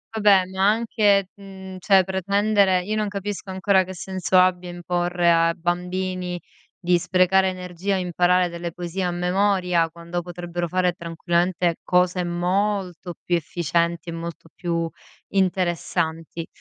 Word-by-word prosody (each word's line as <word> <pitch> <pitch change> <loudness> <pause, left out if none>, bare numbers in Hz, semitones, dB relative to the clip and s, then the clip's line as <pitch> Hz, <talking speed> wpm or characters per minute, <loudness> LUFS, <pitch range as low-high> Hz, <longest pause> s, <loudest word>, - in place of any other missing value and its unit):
Vabbè, 205 -3 +5
neanche, 200 +1 +2
mhmm, 190 -1 -10
cioè, 195 0 +4
pretendere 195 0 +2
io 210 +4 -2
non 215 -1 0
capisco 200 -1 -5
ancora 190 0 +2
che 185 +1 -8
senso 185 0 0
abbia 180 -1 +2
imporre 175 0 0
a 165 0 +3
bambini 180 +1 -3 0.4
di 175 0 +3
sprecare 185 +2 +3
energia 185 +1 -3
e - - 0
imparare 180 0 +2
delle 170 0 -5
poesie 175 +2 -4
a 180 - 0
memoria 180 -1 +1
quando 170 +1 -5
potrebbero 175 0 -4
fare 180 +1 +1
tranquillamente 170 +1 0
cose 180 0 +2
molto 180 0 -1
più 175 - +1
efficienti 170 +1 -1
e - - -3
molto 165 -1 -7
più 170 -2 -2 0.4
interessanti. 170 -3 -1
180 Hz, 130 wpm, -23 LUFS, 175-190 Hz, 0.4 s, Vabbè